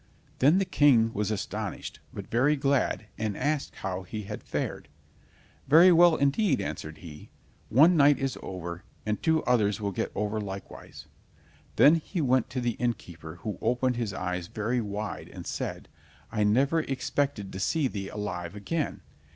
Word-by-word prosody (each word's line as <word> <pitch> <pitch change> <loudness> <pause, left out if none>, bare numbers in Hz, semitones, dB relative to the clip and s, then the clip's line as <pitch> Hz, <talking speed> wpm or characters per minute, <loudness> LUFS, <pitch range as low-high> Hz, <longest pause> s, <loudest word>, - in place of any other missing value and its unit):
Then 145 +7 +5
the 195 - +2
King 120 -9 +4
was 105 0 -1
astonished, 110 -1 -4
but - - -7
very 130 +6 +3
glad, 135 -5 0
and 110 -2 -2
asked 145 +1 -1
how 95 -1 -2
he 105 +3 -6
had 105 +1 -7
fared. 70 - -4 0.8
"Very 165 +6 +8
well 175 -1 +6
indeed," 140 +9 +2
answered 75 +1 -5
he; 80 -2 -11 0.4
"one 160 +9 +6
night 145 -1 +6
is 135 -2 -2
over, 85 -1 -6 0.2
the 105 - 0
two 160 +8 +1
others 105 -5 +2
will 100 -2 -2
get - - -3
over 105 +1 -1
likewise." 95 -1 -8 0.7
Then 155 +4 +7
he 170 +3 -5
went 130 -3 +2
to 125 0 -3
the 120 -2 -1
innkeeper, 85 -9 -4
who 105 -4 -4
opened 125 +2 +1
his 115 -4 -2
eyes 90 -2 -3
very 115 +5 -1
wide, 105 0 -5
and - - -9
said: - - -4 0.4
"I 105 -2 0
never 135 +10 +3
expected 135 -6 -2
to 95 - -5
see 145 - +1
thee 100 -5 -5
alive 90 -3 -5
again! 150 +10 -3
115 Hz, 160 wpm, -28 LUFS, 100-140 Hz, 0.8 s, Very